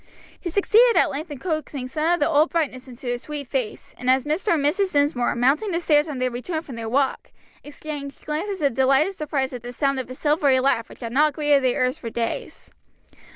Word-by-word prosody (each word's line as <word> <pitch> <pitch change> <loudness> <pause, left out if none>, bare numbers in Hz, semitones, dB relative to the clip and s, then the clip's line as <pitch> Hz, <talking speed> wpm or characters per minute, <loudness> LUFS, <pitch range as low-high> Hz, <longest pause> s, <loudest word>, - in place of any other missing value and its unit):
He 350 - -4
succeeded 445 +6 +4
at - - +4
length 310 +4 -5
in 290 - -6
coaxing 305 -4 -3
some 315 +6 +1
of - - -7
the 290 - +2
old 310 0 +3
brightness 275 -6 -2
into 250 +1 -12
the 245 0 -1
sweet 295 +1 -6
face, 250 -4 -4
and 250 - -1
Mr. 300 - +2
and 285 -3 -1
Mrs. 370 +5 +1
Dinsmore, 285 -4 +1
mounting 275 - +2
the 340 -2 0
stairs 305 -2 +3
on 285 - -4
their 255 0 0
return 315 +7 -4
from 270 -6 -9
their 225 -1 -5
walk, 270 +2 0 0.3
exchanged 290 -1 -8
glances 330 +4 -3
of 280 - +2
delighted 270 +8 +3
surprise 280 -6 -2
at 245 - -6
the 245 +1 -7
sound 275 +1 0
of 255 - -6
a 255 - -7
silvery 290 -2 +2
laugh 255 -4 +1
which - - -14
had 230 -1 -5
not 300 +2 +3
greeted 295 -2 +2
their 255 0 +2
ears 255 - -2
for 230 - -5
days. 230 0 -4
285 Hz, 220 wpm, -23 LUFS, 255-310 Hz, 0.3 s, succeeded